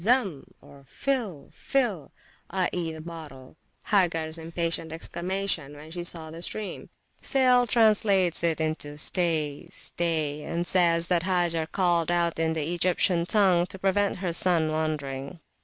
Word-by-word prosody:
Zam! 205 - +1 0.4
(fill! 230 - -3
fill! 220 - -1 0.4
i.e. 180 -2 -1
the 160 0 -8
bottle), 155 -6 -10 0.4
Hagars 165 -5 +1
impatient 165 0 -1
exclamation 170 -2 -3
when 150 +2 -12
she 175 +1 -5
saw 165 -2 -2
the 165 +1 -9
stream. 210 +3 -6 0.3
Sale 250 -2 +3
translates 205 -6 +3
it 165 -1 +1 0.4
stay! 155 -4 0
stay! 155 -3 -2
and 170 +3 -3
says 170 -2 +4
that 175 -2 +3
Hagar 170 -3 0
called 175 -3 +1
out 170 -1 0
in 160 0 +1
the 160 +1 -2
Egyptian 175 0 +2
language, 185 -4 +3
to - - -6
prevent 195 +1 +1
her 180 -2 -3
son 165 -3 +3
wandering. 150 -2 -3
170 Hz, 130 wpm, -26 LUFS, 160-190 Hz, 0.4 s, says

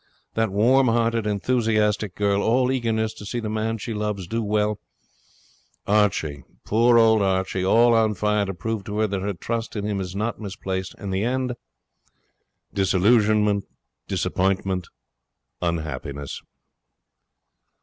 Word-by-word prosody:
That 115 -1 +1
warm 125 +7 +4
hearted, 115 -1 +1
enthusiastic 105 -2 +1
girl, 100 -1 +1
all 125 +4 +2
eagerness 110 -4 0
to - - -11
see 120 +4 -3
the 110 -2 -4
man 110 +1 -1
she 115 +2 -5
loves 105 -3 -3
do 115 +7 -2
well 105 0 0 1.1
Archie, 90 -9 +1 0.2
poor 115 +2 +4
old 110 -2 +5
Archie, 95 -1 0
all 115 +5 +5
on 110 -2 +3
fire 105 +1 +1
to 95 - -4
prove 115 +1 -3
to 105 - -4
her 110 - +3
that 100 -2 -2
her 100 0 -2
trust 115 +7 -4
in 105 -1 -3
him 100 -2 -1
is 90 0 -6
not 110 +3 -2
misplaced, 95 -2 -4
and 100 -2 -5
the 95 +2 0
end 125 +1 -1 1.2
Disillusionment 105 +1 +3 0.4
Disappointment 95 -1 0 0.7
Unhappiness.' 75 -4 -4
105 Hz, 135 wpm, -24 LUFS, 95-115 Hz, 1.2 s, old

